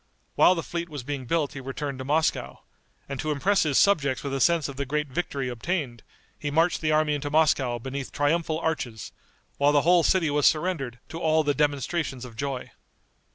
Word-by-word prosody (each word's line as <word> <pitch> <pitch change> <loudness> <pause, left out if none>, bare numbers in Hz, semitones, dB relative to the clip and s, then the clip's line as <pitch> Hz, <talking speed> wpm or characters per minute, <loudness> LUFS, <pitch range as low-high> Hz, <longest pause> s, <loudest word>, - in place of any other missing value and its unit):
While 185 - +5
the 165 - -3
fleet 170 0 -4
was 145 -5 -6
being 135 -1 -5
built 155 -2 0
he 140 - -6
returned 135 +1 -5
to - - -4
Moscow, 155 +4 -1 0.4
and 140 -2 -5
to 155 - -2
impress 190 +8 +2
his 150 -4 +1
subjects 145 -10 +3
with 140 -1 -3
a 135 - -1
sense 170 -1 +3
of 140 - -7
the 140 - -2
great 150 +1 -1
victory 140 -2 -3
obtained, 125 - -3 0.4
he 145 - -3
marched 165 +4 +2
the 155 -1 +1
army 155 -1 +2
into 145 0 -3
Moscow 145 -5 +2
beneath 130 +3 -6
triumphal 155 +2 0
arches, 145 -10 -3 0.5
while 140 +1 +4
the 145 -1 +4
whole 175 +1 +5
city 165 -3 +2
was 145 -1 +3
surrendered 155 -7 0
to 165 - -6
all 160 -1 +2
the 145 -1 +1
demonstrations 145 -2 -1
of 120 -3 -11
joy. 135 +1 -4
145 Hz, 200 wpm, -26 LUFS, 135-160 Hz, 0.5 s, While